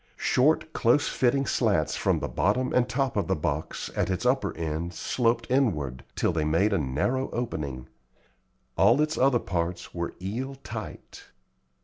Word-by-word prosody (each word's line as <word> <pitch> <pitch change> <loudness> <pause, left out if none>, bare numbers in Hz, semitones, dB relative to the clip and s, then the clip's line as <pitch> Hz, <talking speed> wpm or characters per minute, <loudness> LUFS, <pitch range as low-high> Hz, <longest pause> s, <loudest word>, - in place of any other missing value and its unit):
Short, 155 +4 +2
close 120 +5 +3
fitting 135 +2 +1
slats 100 - +1
from - - +1
the - - -2
bottom 105 - 0
and 125 0 +2
top 130 +1 0
of 100 - 0
the 95 - +1
box, 75 0 -3
at - - 0
its 95 +6 -2
upper 130 -6 +1
end, 80 +2 -3
sloped 115 -1 0
inward, 75 - 0
till - - +1
they 80 -2 0
made 85 +8 +2
a 100 - +2
narrow 80 - -1
opening. 70 - -4 0.9
All 115 +8 +5
its 155 +1 +1
other 130 -1 +4
parts 85 -4 -3
were 85 -1 -4
eel 120 +9 -4
tight. 110 -3 -8
110 Hz, 155 wpm, -27 LUFS, 85-130 Hz, 0.9 s, All